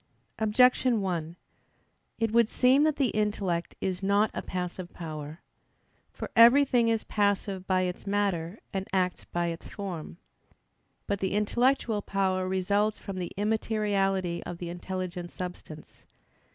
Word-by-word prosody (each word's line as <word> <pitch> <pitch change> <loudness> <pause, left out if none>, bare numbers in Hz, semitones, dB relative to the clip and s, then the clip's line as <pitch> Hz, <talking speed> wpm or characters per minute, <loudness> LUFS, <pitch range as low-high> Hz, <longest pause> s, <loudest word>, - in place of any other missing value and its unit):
Objection 245 +2 +4
1: 170 -4 -2 0.8
It 225 -1 0
would 230 -1 +4
seem 260 +2 +4
that 310 -2 +2
the 270 -5 +1
intellect 205 -5 -1
is 185 -1 -2
not 200 +2 +2
a - - -3
passive 180 0 -5
power. 155 -1 -7 0.7
For - - -7
everything 240 +1 +6
is 225 -1 +1
passive 200 -2 0
by 185 -1 +2
its 180 +2 -3
matter, 195 -3 0 0.2
and 195 0 -3
acts 185 -1 0
by 175 0 -1
its 165 0 -6
form. 180 -5 -6 0.9
But 200 -1 -1
the 190 -1 -1
intellectual 225 +1 +1
power 190 -2 0
results 200 +3 +1
from 195 -1 -7
the 180 -2 -4
immateriality 200 -4 0
of 175 - -6
the 175 0 -6
intelligent 180 0 -5
substance. 180 -4 -9
195 Hz, 135 wpm, -28 LUFS, 180-215 Hz, 0.9 s, everything